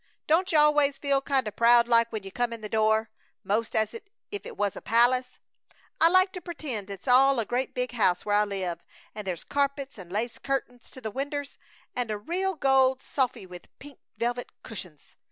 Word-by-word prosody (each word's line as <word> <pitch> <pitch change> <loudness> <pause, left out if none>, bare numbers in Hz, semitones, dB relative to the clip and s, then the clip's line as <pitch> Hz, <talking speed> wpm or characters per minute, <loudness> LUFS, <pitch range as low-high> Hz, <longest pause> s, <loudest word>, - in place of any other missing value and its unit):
Don't 360 +4 +2
you 315 - +4
always 295 -2 +4
feel 280 -1 +1
kinda 265 -6 0
proud 235 +2 +5
like 230 -1 +4
when 215 -3 -4
you 195 - -9
come 240 +3 -1
in 230 -1 -7
the 210 - -4
door, 220 +1 +1 0.3
'most 220 +3 -1
as 220 -1 +1
if 460 - -7 0.3
it 410 - -7
was 205 -1 0
a - - -8
palace? 250 +2 +2 0.6
I 330 - +6
like 370 +2 +4
to 365 - -7
pertend 285 - -5
it's 200 +5 -8
all 265 +1 +5
a 225 - -1
great 250 +3 -2
big 250 0 -2
house 190 -7 +1
where 205 0 +2
I 210 - +4
live, 185 -4 -3 0.3
and 210 -2 -7
there's 175 -3 -3
carpets 280 -3 -2
and 180 -2 -10
lace 225 +4 -2
curtings 245 -3 -3
to 260 - -11
the 220 -2 -4
winders, 285 +3 -4 0.4
and 245 -2 -1
a 215 - -2
real 365 - -2
gold 265 -2 +3
sofy 255 -7 -1
with 180 -1 -12
pink 285 -1 -13 0.2
velvet 240 +2 -2
cushings! 180 -9 -9
245 Hz, 200 wpm, -27 LUFS, 215-275 Hz, 0.6 s, I